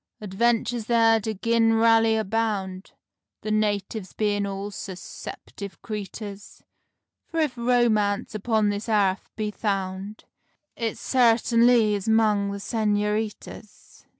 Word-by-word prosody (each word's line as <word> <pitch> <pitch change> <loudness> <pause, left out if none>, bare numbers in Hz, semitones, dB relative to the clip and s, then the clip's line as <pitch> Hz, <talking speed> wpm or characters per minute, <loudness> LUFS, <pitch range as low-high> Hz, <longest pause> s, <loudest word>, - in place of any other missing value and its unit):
Adventures 230 +3 0
there 225 -1 +4
do 220 +1 -3
gin'rally 225 +1 +3
abound, 205 -3 -2 0.5
The 215 - -4
natives 205 -2 -1
being 205 -1 0
all 200 +1 -5
sus 190 -2 -7
ceptive 200 -1 -9
creeters; 205 -1 -7 0.6
For 330 - -3
if 300 -6 0
romance 235 -3 +1
upon 215 0 +1
this 205 +3 -3
airth 200 -3 +1
is 210 -1 -2
found, 195 0 -3 0.5
It 230 -2 -3
sartinly 235 -2 +3
is 200 0 -3
'mong 215 -3 +2
the 200 - -5
senoritas. 210 0 -3
215 Hz, 110 wpm, -25 LUFS, 200-225 Hz, 0.6 s, there